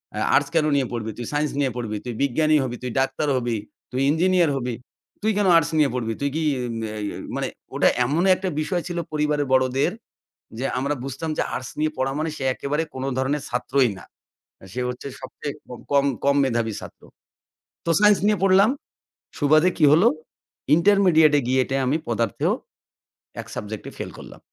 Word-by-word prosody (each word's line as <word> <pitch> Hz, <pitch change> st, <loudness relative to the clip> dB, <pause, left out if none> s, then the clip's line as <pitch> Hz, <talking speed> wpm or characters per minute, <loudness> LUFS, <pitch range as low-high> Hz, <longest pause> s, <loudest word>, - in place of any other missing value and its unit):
আ -, -, -3 dB, 0.2 s
arts 145 Hz, +1 st, +2 dB
কেনো 155 Hz, -2 st, +3 dB
নিয়ে 135 Hz, -3 st, +1 dB
পড়বি? 110 Hz, -2 st, -3 dB
তুই 120 Hz, -, -5 dB
সাইন্স 150 Hz, +1 st, +1 dB
নিয়ে 135 Hz, -3 st, +1 dB
পড়বি, 110 Hz, -3 st, -3 dB
তুই 120 Hz, -, -4 dB
বিজ্ঞানী 155 Hz, +3 st, +2 dB
হবি, 125 Hz, -2 st, -3 dB
তুই 125 Hz, -, -3 dB
ডাক্তার 135 Hz, +3 st, 0 dB
হবি, 120 Hz, -2 st, -1 dB, 0.3 s
তুই 130 Hz, +1 st, -1 dB
ইঞ্জিনিয়ার 175 Hz, 0 st, +3 dB
হবি। 125 Hz, -2 st, -3 dB, 0.5 s
তুই 220 Hz, -, +2 dB
কেনো 200 Hz, -2 st, +3 dB
আর্টস 165 Hz, 0 st, +1 dB
নিয়ে 150 Hz, -3 st, +4 dB
পড়বি? 115 Hz, -3 st, -2 dB
তুই 140 Hz, -, +1 dB
কি 160 Hz, -, 0 dB
ই -, -, -4 dB, 0.5 s
ই -, -, -2 dB, 0.3 s
মানে -, -, -1 dB, 0.3 s
ওটা -, -, +4 dB, 0.2 s
এমন 150 Hz, +7 st, +1 dB
একটা 185 Hz, 0 st, -3 dB
বিষয় 175 Hz, +3 st, -1 dB
ছিল 175 Hz, -1 st, -4 dB
পরিবারের 150 Hz, -1 st, 0 dB
বড়দের। 130 Hz, +6 st, +2 dB, 0.7 s
যে 130 Hz, -, -3 dB
আমরা 140 Hz, +3 st, 0 dB
বুঝতাম 135 Hz, +4 st, -4 dB
যে -, -, +3 dB
আর্টস 130 Hz, -, -5 dB
নিয়ে 155 Hz, 0 st, +1 dB
পড়া 130 Hz, +1 st, 0 dB
মানে 160 Hz, +1 st, -1 dB
সে 135 Hz, -, -5 dB
একেবারে 150 Hz, +4 st, -2 dB
কোনো 130 Hz, 0 st, -4 dB
ধরনের 135 Hz, +2 st, 0 dB
ছাত্রই 125 Hz, +1 st, +1 dB
না। -, -, -12 dB, 0.7 s
সে 125 Hz, -, -3 dB
হচ্ছে 125 Hz, +2 st, -6 dB
সবচেয়ে 140 Hz, +2 st, -6 dB, 0.4 s
কম 140 Hz, 0 st, +4 dB, 0.2 s
কম 140 Hz, 0 st, +3 dB
মেধাবী 115 Hz, -4 st, 0 dB
ছাত্র। -, -, -11 dB, 0.8 s
তো 170 Hz, -, -1 dB
সাইন্স 210 Hz, -1 st, +6 dB
নিয়ে 210 Hz, -1 st, +3 dB
পড়লাম। 195 Hz, +3 st, +5 dB, 0.7 s
সুবাদে 155 Hz, +4 st, +4 dB
কি 155 Hz, -, +5 dB
হলো 170 Hz, +9 st, +6 dB, 0.7 s
ইন্টারমিডিয়েট 170 Hz, -4 st, +5 dB
এ -, -, -2 dB
গিয়ে 130 Hz, +1 st, +3 dB
টে 135 Hz, -, 0 dB
আমি 140 Hz, +5 st, +1 dB
পদার্থেও 115 Hz, -3 st, 0 dB, 0.9 s
১ -, -, -14 dB
সাবজেক্ট 105 Hz, 0 st, -6 dB
এ -, -, -13 dB
ফেইল -, -, -5 dB
করলাম। -, -, -11 dB
140 Hz, 180 wpm, -23 LUFS, 130-160 Hz, 0.9 s, সাইন্স